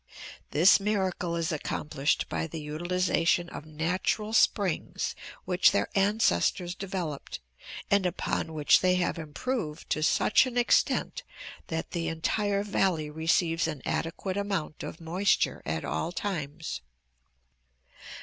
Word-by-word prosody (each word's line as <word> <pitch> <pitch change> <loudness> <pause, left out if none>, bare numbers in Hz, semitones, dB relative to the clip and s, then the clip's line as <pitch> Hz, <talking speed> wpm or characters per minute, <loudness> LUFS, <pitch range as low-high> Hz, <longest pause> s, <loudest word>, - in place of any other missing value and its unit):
This 170 +8 +6
miracle 190 -4 -1
is 165 -1 -1
accomplished 150 -2 -1
by 165 - -2
the 160 0 -6
utilization 175 +2 0
of 155 - -9
natural 180 +7 -1
springs 200 -5 +1 0.3
which 180 0 +4
their - - +1
ancestors 195 -3 +2
developed, 180 -7 -5 0.5
and 200 -2 +4
upon 170 -2 -2
which 150 -2 +5
they 180 0 +3
have 180 -2 0
improved 160 - -4
to 155 - +1
such 210 +10 +4
an 245 -1 -5
extent 245 - +2 0.5
that 160 0 -4
the 170 -2 -2
entire 200 +5 0
valley 185 -7 0
receives 165 +1 +1
an 150 -5 -5
adequate 185 +3 -2
amount 195 -7 -2
of - - -7
moisture 180 +4 +1
at 80 +1 -2
all 165 - -2
times. 160 - -4
175 Hz, 120 wpm, -28 LUFS, 160-195 Hz, 0.5 s, This